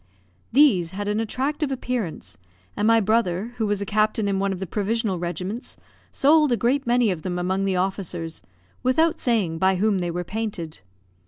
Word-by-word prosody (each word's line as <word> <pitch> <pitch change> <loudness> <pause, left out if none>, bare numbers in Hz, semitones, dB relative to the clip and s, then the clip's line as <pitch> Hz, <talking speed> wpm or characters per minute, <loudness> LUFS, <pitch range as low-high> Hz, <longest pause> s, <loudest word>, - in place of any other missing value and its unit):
These 225 - +5
had 205 0 -3
an 210 +1 0
attractive 275 +6 -1
appearance; 225 - -4 0.4
and 210 - +1
my 230 0 +6
brother, 215 0 0
who 220 -2 0
was 205 -1 0
a - - -6
captain 215 +1 +1
in 195 -1 0
one 195 0 0
of 190 - -3
the 190 - -3
provisional 210 0 -1
regiments, 185 - -5 0.3
sold 300 0 +4
a 240 - +3
great 250 +5 +1
many 240 -3 +3
of 175 -4 -4
them 180 0 -3
among 190 +2 0
the 190 -1 0
officers, 180 -3 -2 0.4
without 310 +6 +2
saying 200 -10 0
by 190 +1 +3
whom 200 +1 +1
they 175 -1 -2
were 175 +1 -3
painted. 185 - -4
205 Hz, 180 wpm, -24 LUFS, 185-235 Hz, 0.4 s, my